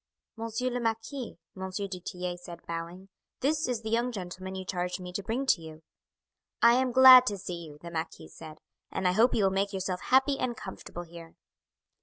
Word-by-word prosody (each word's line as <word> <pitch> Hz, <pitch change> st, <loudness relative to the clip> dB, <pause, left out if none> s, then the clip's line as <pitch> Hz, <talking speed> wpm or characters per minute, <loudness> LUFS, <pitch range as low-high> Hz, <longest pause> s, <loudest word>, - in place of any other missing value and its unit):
"Monsieur 230 Hz, +2 st, -2 dB
le 245 Hz, -, -2 dB
Marquis," 230 Hz, +3 st, -3 dB, 0.2 s
M. 190 Hz, 0 st, -5 dB
du 190 Hz, -1 st, -4 dB
Tillet 180 Hz, 0 st, -5 dB
said, 170 Hz, -1 st, -11 dB
bowing, 170 Hz, +3 st, -6 dB, 0.3 s
"this 300 Hz, +2 st, +1 dB
is 240 Hz, -3 st, -2 dB
the 220 Hz, -, -4 dB
young 240 Hz, +2 st, +1 dB
gentleman 190 Hz, -2 st, -6 dB
you 190 Hz, 0 st, -5 dB
charged 180 Hz, 0 st, -2 dB
me 180 Hz, -1 st, -8 dB
to 200 Hz, -, -2 dB
bring 230 Hz, +7 st, -2 dB
to 195 Hz, -10 st, +3 dB
you. 160 Hz, 0 st, -11 dB, 0.8 s
"I 235 Hz, 0 st, +7 dB
am 255 Hz, +1 st, +2 dB
glad 255 Hz, 0 st, +10 dB
to 205 Hz, -, -1 dB
see 175 Hz, -2 st, -6 dB
you," 150 Hz, -1 st, -12 dB
the 170 Hz, -, -7 dB
marquis 160 Hz, -1 st, -5 dB
said; 155 Hz, -1 st, -11 dB, 0.3 s
"and 185 Hz, -, 0 dB
I -, -, +4 dB
hope 225 Hz, +7 st, +4 dB
you 215 Hz, -, +2 dB
will 190 Hz, -, +3 dB
make 195 Hz, +1 st, 0 dB
yourself 185 Hz, -1 st, -2 dB
happy 270 Hz, +2 st, +3 dB
and 240 Hz, -2 st, -2 dB
comfortable 175 Hz, -2 st, -8 dB
here." 165 Hz, -1 st, -12 dB
195 Hz, 200 wpm, -29 LUFS, 180-235 Hz, 0.8 s, glad